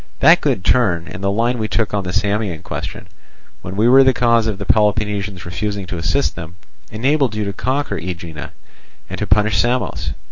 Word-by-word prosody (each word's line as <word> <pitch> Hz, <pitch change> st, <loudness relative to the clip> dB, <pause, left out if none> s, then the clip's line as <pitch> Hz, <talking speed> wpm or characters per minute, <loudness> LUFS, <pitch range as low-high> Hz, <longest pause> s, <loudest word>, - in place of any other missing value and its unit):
That -, -, +6 dB
good 90 Hz, -, -1 dB
turn, 90 Hz, -9 st, +2 dB
and 90 Hz, -, -8 dB
the 100 Hz, -, +1 dB
line 115 Hz, +4 st, 0 dB
we 110 Hz, -, -1 dB
took 110 Hz, -2 st, -1 dB
on 100 Hz, -1 st, 0 dB
the 90 Hz, -, -3 dB
Samian 105 Hz, -4 st, -1 dB
question, -, -, -6 dB, 0.5 s
when 95 Hz, -, -7 dB
we 110 Hz, +3 st, +3 dB
were 135 Hz, +2 st, +7 dB
the 130 Hz, -1 st, +3 dB
cause 115 Hz, -2 st, +3 dB
of 105 Hz, -3 st, -2 dB
the 100 Hz, -, -6 dB
Peloponnesians 105 Hz, -2 st, 0 dB
refusing 100 Hz, +3 st, -3 dB
to 90 Hz, -1 st, -5 dB
assist 140 Hz, +11 st, 0 dB
them, 80 Hz, +1 st, -8 dB, 0.3 s
enabled 130 Hz, +1 st, +1 dB
you 105 Hz, -1 st, -2 dB
to 100 Hz, -, -3 dB
conquer 130 Hz, -2 st, -2 dB
Aegina 85 Hz, -3 st, -7 dB, 0.6 s
and -, -, -5 dB
to -, -, -2 dB
punish 105 Hz, -1 st, +3 dB
Samos. 90 Hz, -, -1 dB
105 Hz, 190 wpm, -18 LUFS, 90-115 Hz, 0.6 s, were